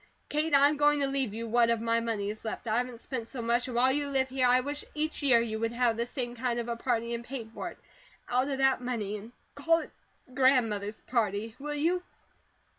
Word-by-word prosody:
Kate, 305 +2 0
I 280 +1 +7
am 295 0 0
going 295 0 +4
to 275 - +2
leave 270 -4 0
you 230 +1 -4
what 235 +1 +3
of 230 -1 +2
my 230 0 +1
money 220 -3 -2
is 215 - -10
left 220 +1 -5
I 220 0 +1
haven't 245 -1 -2
spent 235 -2 -4
so 260 - -7
much 235 +2 +1
and 250 - -5
while 255 +2 +4
you 285 +1 -1
live 265 -1 +1
here, 255 -1 +2
I 250 +1 +5
wish 285 +2 -4
each 310 +1 -2
year 260 -5 +5
you 220 -1 -3
would 230 +1 -1
have 240 -1 +2
this 235 +1 -2
same 245 -3 -4
kind 245 0 -1
of 235 - -3
a 235 - -2
party 235 -1 -1
and 235 0 -4
pay 245 -1 -6
for 220 - -6
it - - -13 0.5
out 255 +2 +1
of 275 - -1
that 270 -1 +3
money, 225 -5 -2
and 215 +3 -11 0.2
call 325 +4 +3
it - - -8 0.4
'Grandmother's 225 -6 +2
Party.' 220 -2 -1
Will 295 +1 -4
you?" 340 +5 +1
245 Hz, 240 wpm, -29 LUFS, 230-270 Hz, 0.5 s, I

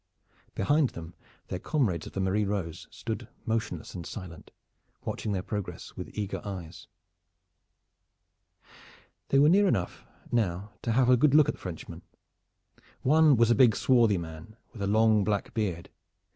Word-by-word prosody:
Behind 145 +6 +2
them 85 +1 -9 0.4
their 90 - -3
comrades 105 - -1
of - - -11
the - - -3
Marie 95 +3 +1
Rose 95 -5 -3
stood 115 0 -5 0.2
motionless 115 -1 -3
and 90 - -6
silent, 85 -2 -9 0.6
watching 105 - -3
their 95 -2 -2
progress 105 -2 -6
with - - -7
eager 100 -2 -3
eyes. 90 -5 -7 2.4
They 135 - +3
were 145 +2 +6
near 200 +5 +5
enough 90 - -1 0.3
now 100 -3 -1
to 115 - -1
have 125 +1 +4
a 125 - +6
good 145 +3 +4
look 150 -2 +6
at - - 0
the - - -16
Frenchmen. 85 -1 -7 1.0
One 155 +1 +5
was 115 +1 +4
a - - +7
big 115 -1 +5
swarthy 120 -5 +3
man 85 +5 -8 0.2
with 110 - -9
a 100 - 0
long 110 0 +4
black 100 0 -1
beard. 95 -7 -3
105 Hz, 155 wpm, -28 LUFS, 90-120 Hz, 2.4 s, a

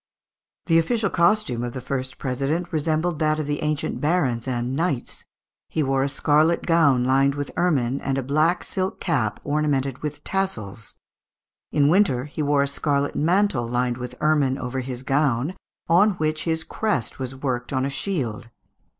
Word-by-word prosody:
The 165 -1 +4
official 205 +4 0
costume 170 - +2
of 120 -1 -4
the 130 - -4
first 130 0 -4
president 140 +7 -2
resembled 155 +1 0
that 155 -1 +2
of 155 - -2
the 145 0 -2
ancient 150 -1 -2
barons 140 -7 +1
and 125 0 -2
knights. 145 -5 -2 0.4
He 155 - 0
wore 135 -1 +1
a 140 - +1
scarlet 155 +4 +2
gown 150 -7 +4
lined 135 +2 +3
with 145 -1 -4
ermine, 140 -7 +1
and 135 0 -1
a 135 - -1
black 155 +6 +2
silk 190 0 -3
cap 110 -6 0
ornamented 140 -3 0
with 150 -1 -5
tassels. 115 - -3 0.8
In 145 -2 +3
winter 155 -7 +3
he 150 +1 -5
wore 145 -1 +3
a - - -1
scarlet 140 0 0
mantle 170 - +2
lined 120 0 0
with 125 -1 -6
ermine 145 -4 +2
over 130 0 -3
his 130 0 -5
gown, 135 +2 +1 0.3
on 195 +5 +5
which 155 -3 -2
his 160 -1 0
crest 150 - -2
was 130 0 -4
worked 125 -2 -3
on 130 -1 0
a 140 - -2
shield. 135 - -3
145 Hz, 165 wpm, -23 LUFS, 130-160 Hz, 0.8 s, on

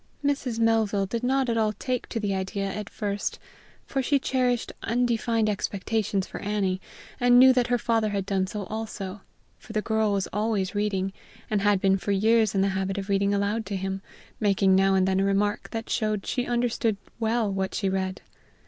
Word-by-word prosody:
Mrs. 275 -5 0
Melville 225 -3 +2
did 230 +4 -3
not 265 +1 +1
at 230 -1 +1
all 215 -1 +2
take 250 +4 -3
to 230 - -2
the 205 -2 -1
idea 190 +1 -2
at 205 +1 -4
first, 205 -1 -3 0.5
for 270 - -1
she 280 +2 +2
cherished 250 -3 0
undefined 230 -1 +1
expections 205 -1 -1
for - - -8
Annie, 195 -2 -1 0.4
and 245 0 +5
knew 260 +1 +8
that 250 -2 +2
her 245 0 +2
father 225 -2 +1
had 200 -2 -2
done 190 -2 0
so 205 +1 -4
also, 210 -2 -5 0.4
for 220 - -11
the 215 - +1
girl 220 -1 +1
was 195 -1 0
always 210 -2 0
reading, 195 -2 -1 0.4
and 210 -2 +2
had 205 -1 +3
been 195 0 +3
for 205 - -2
years 220 +1 +3
in 195 - +3
the 195 - +2
habit 190 +1 -2
of 200 0 -4
reading 200 0 +2
aloud 205 +2 0
to 200 - -3
him, 190 0 -3 0.4
making 195 -2 +3
now 195 0 +4
and 190 0 +3
then 190 0 +2
a - - +2
remark 200 +2 0
that 225 -1 -5
showed 215 -3 -1
she 250 -2 -1
understood 235 -3 0 0.2
well 225 -2 +1
what 190 0 -2
she 200 - 0
read. 190 0 -2
210 Hz, 195 wpm, -26 LUFS, 195-230 Hz, 0.5 s, knew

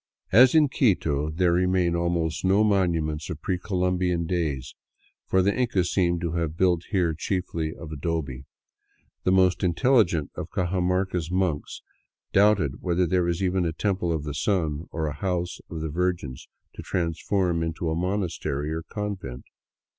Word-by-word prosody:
As 125 +5 +7
in 155 -2 +6
Quito, 80 - +1
there 85 +2 +2
remain 90 -1 +2
almost 85 -2 -1
no 95 +3 +4
monuments 85 -6 +1
of 80 -4 -5
pre 90 +3 -2
Conquest 90 -2 0
days, 80 -7 -2 0.5
for 95 0 +3
the 100 +2 +2
Incas 115 -8 +1
seem 85 -2 +1
to 85 -2 -2
have 85 -1 -2
built 90 -2 +2
here 90 -4 +1
chiefly 80 -2 -2
of 80 -2 -9
adobe. 75 -4 -3 0.8
The 90 - +3
most 95 -1 +4
inteUigent 90 - +2
of - - -6
Cajamarca's 90 -1 0
monks 90 -5 -2 0.5
doubted 100 -9 +3
whether 90 0 +1
there 90 +2 +1
was 85 +2 -1
even 95 0 +1
a 85 -2 -1
Temple 95 -1 -1
of 80 -3 -1
the 75 -1 -4
Sun 80 -1 -1
or 80 -1 -3
a 75 - -2
House 90 -2 -2
of 80 -2 -5
the 80 - -3
Virgins 85 -5 -2 0.3
to - - -8
transform 85 +1 -1
into 80 0 -2
monastery 80 -5 -2
or 80 - -3
convent. 95 - -5
85 Hz, 155 wpm, -25 LUFS, 80-95 Hz, 0.8 s, As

